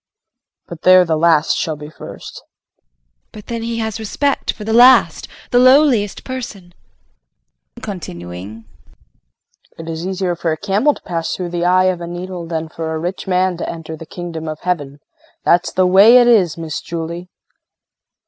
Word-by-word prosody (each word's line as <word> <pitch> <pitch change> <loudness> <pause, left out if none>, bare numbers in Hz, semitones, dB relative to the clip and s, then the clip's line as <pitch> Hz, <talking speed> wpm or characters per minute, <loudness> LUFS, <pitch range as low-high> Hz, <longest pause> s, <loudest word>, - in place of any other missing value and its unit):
But 170 -1 -10
there 185 0 +6
the 165 -1 0
last 160 -1 +3
shall 155 - -2
be 150 +1 -10
first. - - -10
JULIE. - - -25
But 210 - -11
then 230 -1 -5
has 230 -2 -3
he - - -9
respect 280 +6 -1
for 210 - -10
the 220 +1 -2
last 250 +3 +5 0.2
the 245 - +4
lowliest 255 -5 +4
person? 215 -9 -7 1.0
KRISTIN - - -14
[Continuing]. 100 - -8 1.1
It 165 - -9
is 165 +2 -4
easier 190 -2 -2
for 165 -1 -2
a 155 - -2
camel 205 - +1
to - - -16
pass 165 -2 -3
through 180 -2 -5
the 175 0 -2
eye 185 +1 +4
of 175 - -10
a 170 - -5
needle 175 0 -6
than 165 -1 -3
for 160 0 -5
a 160 - -2
rich 180 +4 -5
man 185 -1 +1
to - - -4
enter 160 -1 -7
the 160 0 -11
Kingdom 170 -3 -7
of 155 0 -6
Heaven. 145 -6 -3 0.4
That's 175 0 +3
the 185 - +2
way 200 +7 +7
it 245 - +6
is, 190 -10 +3
Miss 160 -2 -5
Julie. 170 +2 -6
175 Hz, 175 wpm, -17 LUFS, 160-200 Hz, 1.1 s, way